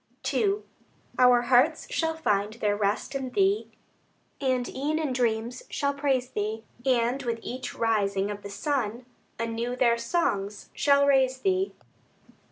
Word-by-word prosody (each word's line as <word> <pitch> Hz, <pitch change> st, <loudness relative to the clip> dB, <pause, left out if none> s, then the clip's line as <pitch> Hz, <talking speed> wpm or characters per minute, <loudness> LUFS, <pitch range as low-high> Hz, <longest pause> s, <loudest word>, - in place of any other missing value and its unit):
II 410 Hz, -1 st, +1 dB, 0.6 s
Our 250 Hz, -1 st, +6 dB
hearts 260 Hz, +6 st, +3 dB
shall 320 Hz, -1 st, 0 dB
find 210 Hz, -8 st, 0 dB
their 210 Hz, -3 st, 0 dB
rest 205 Hz, +4 st, -1 dB
in 265 Hz, -2 st, -3 dB
Thee, 395 Hz, -, +1 dB, 0.7 s
And 255 Hz, -2 st, +1 dB
e'en 295 Hz, +4 st, -2 dB
in 305 Hz, -5 st, -1 dB
dreams 235 Hz, 0 st, -1 dB
shall 280 Hz, -1 st, 0 dB
praise 275 Hz, -3 st, 0 dB
Thee; 215 Hz, +2 st, -3 dB, 0.2 s
And 250 Hz, 0 st, +2 dB
with 235 Hz, -1 st, -2 dB
each 255 Hz, +1 st, -5 dB
rising 205 Hz, -3 st, +1 dB
of 205 Hz, 0 st, -6 dB
the 200 Hz, -, -8 dB
sun, 235 Hz, +1 st, -2 dB, 0.3 s
Anew 230 Hz, +2 st, -2 dB
their 235 Hz, -2 st, +3 dB
songs 210 Hz, -, -1 dB
shall 280 Hz, -1 st, +4 dB
raise 265 Hz, -2 st, +3 dB
Thee. 380 Hz, 0 st, +1 dB
250 Hz, 140 wpm, -27 LUFS, 220-280 Hz, 0.7 s, Our